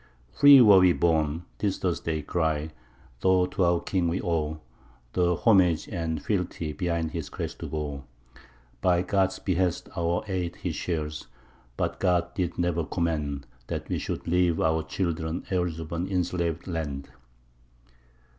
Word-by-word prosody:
Free 140 - +8
were 105 -5 +8
we 90 -1 +5
born, 80 -1 +1
'tis 100 -2 0
thus 90 -3 -1
they 80 -2 -3
cry, 80 -2 -1 0.5
though 95 +2 +3
to 90 - -1
our 85 -1 +3
king 90 -3 0
we 85 +2 0
owe 80 -2 -1 0.5
The 90 -1 +2
homage 90 -5 +3
and 80 -4 -2
the - - -9
fealty 90 -6 -2
behind 85 -3 -1
his - - -5
crest - - -5
to - - -5
go: 75 -3 -4 0.8
By 90 -1 +3
God's 95 -1 +1
behest 90 -2 -1
our 85 +1 0
aid 90 -3 -2
he - - -3
shares, 75 -4 -3 0.5
but - - -2
God 90 -2 +1
did 90 -3 -2
ne'er 85 -1 0
command 75 -3 -2 0.2
That - - -5
we - - -1
should - - -5
leave 90 -1 +2
our 80 0 +2
children 80 -1 -3
heirs 90 -3 0
of 80 -1 -7
an 85 +2 -2
enslavèd 85 -3 -1
land. 75 -6 -4
85 Hz, 155 wpm, -27 LUFS, 80-90 Hz, 0.8 s, Free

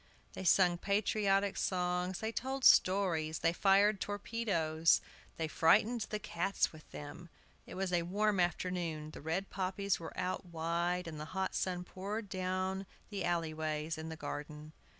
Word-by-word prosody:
They - - -6
sung 175 -1 +4
patriotic 200 0 +1
songs, 180 0 -1
they 220 0 -1
told 265 +3 -2
stories, 170 -5 +4
they 165 - +4
fired 200 +2 +4
torpedoes, 195 -7 +1 0.4
they 160 - -1
frightened 215 +9 +3
the 215 - -1
cats 195 -2 -1
with 155 -1 -14
them. 155 +4 -9 0.4
It - - -8
was 190 -1 -2
a 175 - +3
warm 200 +3 +1
afternoon; 175 -3 -1
the - - -10
red 165 +6 -2
poppies 195 +1 -1
were 165 - -8
out 185 - -2
wide, 170 +2 -1
and 155 -2 -6
the 150 - -5
hot 190 - 0
sun 180 -1 -1
poured 200 +4 -5
down 185 0 -1
on 195 - -7 0.3
the 200 -2 -3
alley 170 -2 0
ways 155 0 -2
in 160 0 -6
the 160 - -5
garden. 150 0 -7
180 Hz, 160 wpm, -34 LUFS, 165-195 Hz, 0.4 s, sung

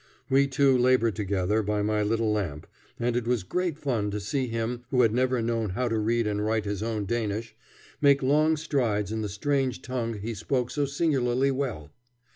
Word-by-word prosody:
We 140 +1 +5
two 135 0 +3
labored 125 -4 +3
together 100 +1 0
by 105 0 -1
my 105 0 +1
little 110 +1 +1
lamp, 85 -8 -2 0.3
and 120 0 0
it 120 -1 -1
was 120 -5 +1
great 175 - -2
fun 120 -9 -1
to 105 +1 -3
see 130 +5 -2
him 115 +1 -3
who 125 -2 +3
had 110 -2 +3
never 125 -1 +1
known 115 -2 -1
how 120 +7 -1
to 115 -1 0
read 115 +2 +1
and 105 0 -1
write 110 0 0
his 100 -1 -3
own 110 -2 -2
Danish 110 0 -2 0.5
make 140 -1 +5
long 155 +4 +3
strides 120 - 0
in 110 0 -2
the 105 - -3
strange 130 +5 -1
tongue 120 -3 -3
he 105 +3 -4
spoke 125 +2 -1
so 145 -1 0
singularly 135 -3 +1
well. 125 - -3
115 Hz, 195 wpm, -27 LUFS, 105-130 Hz, 0.5 s, We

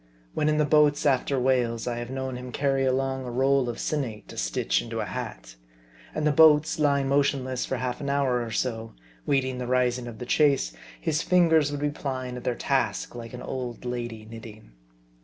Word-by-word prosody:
When 155 - +1
in 150 - +2
the 150 - +3
boats 150 0 +3
after 135 -1 +2
whales, 125 -3 +1
I 120 -1 -2
have 120 0 -5
known 130 -1 -4
him 125 0 -7
carry 135 0 +1
along 130 0 0
a 125 - -5
roll 135 +1 +2
of 120 - -4
sinnate 125 -9 -3
to - - -9
stitch - - 0
into - - -5
a - - -1
hat. - - -7 0.6
And 150 - -1
the 150 - +4
boats 160 +1 +5
lying 140 -2 +2
motionless 135 -2 +1
for 130 - -2
half 125 0 -3
an 140 - -3
hour 135 -3 +1
or 115 - -4
so, 115 0 -3 0.3
waiting 130 -2 +1
the 125 - -4
rising 125 -1 +1
of 115 -2 -8
the 125 - -6
chase, 140 - +2 0.3
his 150 - 0
fingers 165 -5 +4
would 145 0 -4
be 145 0 +1
plying 130 -3 -4
at 125 - -7
their 125 - -1
task, - - -1
like 115 0 -8
an 125 - -8
old 125 -2 -5
lady 120 -3 -4
knitting. 110 - -11
130 Hz, 200 wpm, -26 LUFS, 120-140 Hz, 0.6 s, boats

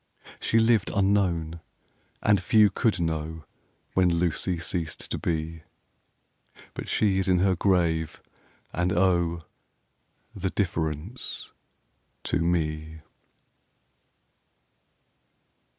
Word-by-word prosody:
She 115 - +1
lived 115 -2 +3
unknown, 90 -5 +1 0.6
and 105 -2 +4
few 105 +2 +5
could 105 0 +1
know 80 -1 -3 0.5
When 95 -1 +4
Lucy 85 +1 0
ceased 85 -2 -3
to - - -2
be; 80 -1 -2 1.0
10 - - -17
But - - -6
she 100 -3 +2
is 95 - 0
in 90 -1 +4
her 95 +1 +3
grave, 85 -4 +1 0.5
and, 90 +1 0
oh, 85 -2 +2 0.9
The 95 - -2
difference 85 - -3 0.7
to - - 0
me! 80 -2 -1
85 Hz, 95 wpm, -26 LUFS, 80-95 Hz, 1.0 s, few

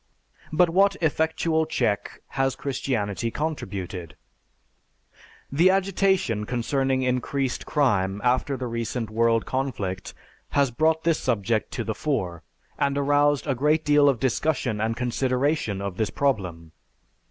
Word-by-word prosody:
But 165 +2 +3
what 195 +3 +4
effectual 160 0 +1
check 110 -9 -1
has 135 0 0
Christianity 115 -5 -2
contributed? 100 - -4 1.4
The 165 +7 +5
agitation 190 - +1
concerning 130 +2 0
increased 130 +1 -1
crime 100 -9 +1
after 130 +2 +1
the 130 - -4
recent 115 -1 -3
world 115 0 +2
conflict 105 -9 -3 0.4
has 140 -3 +3
brought 160 +5 +1
this 165 -2 +2
subject 115 -3 0
to 120 - -2
the 110 - -2
fore, 95 - -2 0.4
and 140 0 +1
aroused 145 0 +2
a 140 - +1
great 150 +5 +1
deal 145 -1 +5
of 130 -5 0
discussion 130 -3 0
and 110 +1 -1
consideration 125 -3 0
of 100 -2 -4
this 110 -2 0
problem. 90 - -1
130 Hz, 125 wpm, -25 LUFS, 110-150 Hz, 1.4 s, The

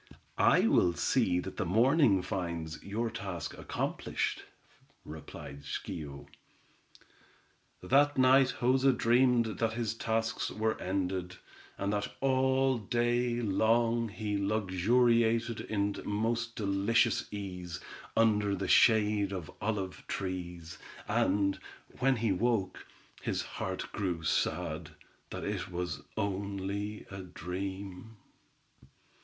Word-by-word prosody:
"I - - +5
will 90 -1 +4
see 95 -8 +2
that 95 - -8
the 105 - 0
morning 115 - +4
finds 85 -4 -4
your 110 +3 -2
task 95 -3 -5
accomplished," - - -3 0.6
replied 75 -2 -9
Schio. 70 -1 -6 1.6
That 145 +2 +4
night 130 0 +5
Joza 130 +2 +4
dreamed 120 -3 +3
that 115 -1 +1
his 115 -2 -1
tasks 115 0 -1
were 110 0 -1
ended, 90 -1 -2 0.4
and 100 +1 -1
that 105 0 -2
all 130 -1 +2
day 120 +2 0
long 115 +3 +2
he 105 -1 -3
luxuriated 115 +4 +2
in 100 -1 0
most 115 +2 -1
delicious 105 +3 +1
ease, 90 -4 -6 0.4
under 105 -3 +3
the 95 0 -3
shade 105 -2 +4
of 90 -5 -5
olive 100 -4 -2
trees, 90 -3 -5 0.3
and, 100 0 +1 0.4
when 135 +1 +3
he 115 -2 0
woke, 105 0 0 0.3
his - - -1
heart - - -4
grew 90 -5 -2
sad, - - -1 0.4
that - - -6
it - - -3
was 90 -4 -4 0.2
only 100 +1 -3
a 95 0 -6
dream. 95 +4 -6
105 Hz, 105 wpm, -31 LUFS, 95-115 Hz, 1.6 s, I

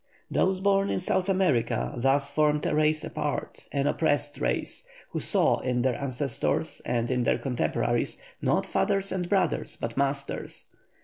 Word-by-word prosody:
Those 190 0 +2
born 195 0 +3
in - - 0
South 185 +1 0
America 175 -12 +1
thus 135 +3 +2
formed 150 0 +2
a - - +1
race 155 +1 +2
apart, 150 -2 -4
an 140 -1 0
oppressed 145 -1 0
race, - - -1 0.3
who - - -2
saw - - +3
in 125 -1 0
their 130 -1 +2
ancestors 135 -1 -2
and 120 +1 0
in 125 -1 +1
their 120 - +2
contemporaries 125 -3 0 0.2
not - - +2
fathers 195 -1 0
and 180 -2 -2
brothers, 190 -6 0
but 115 0 -4
masters. 140 0 -2
145 Hz, 150 wpm, -27 LUFS, 135-180 Hz, 0.3 s, born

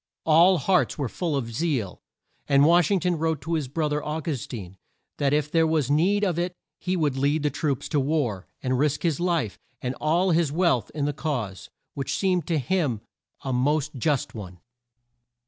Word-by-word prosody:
All 170 +4 +6
hearts 180 +5 +1
were 140 -4 -1
full 165 +5 -2
of 115 -4 -3
zeal; 125 - -2 0.5
and 140 0 +5
Wash 170 +1 +5
ing 200 -2 +2
ton 175 -3 0
wrote 160 -2 0
to 165 +5 -3
his 155 -5 -1
bro 150 +4 -1
ther, 150 0 -2
Au 150 +1 -3
gus 150 -5 -4
tine, 95 -5 -8 0.4
that 140 -1 +1
if 150 0 +1
there 165 -1 +3
was 155 -4 +1
need 190 +8 +3
of 175 -4 +1
it 180 +1 -2 0.2
he 185 0 -1
would 150 -5 +1
lead 145 +3 +1
troops 140 -2 -1
to 150 - +1
war, 130 - -1 0.2
and 130 -1 0
risk 150 0 +1
his 165 -5 +1
life 170 - -1 0.2
and 125 0 -3
all 170 +5 +2
his 165 -3 +2
wealth 155 - +1
in 145 -2 -1
the 145 - -1
cause, 125 - -4 0.2
which 135 -1 -3
seemed 185 -3 +1
to 165 - +1
him 140 - 0 0.4
a 130 - -2
most 145 +4 +1
just 140 +1 -1
one. 95 -5 -9
150 Hz, 195 wpm, -25 LUFS, 130-170 Hz, 0.5 s, All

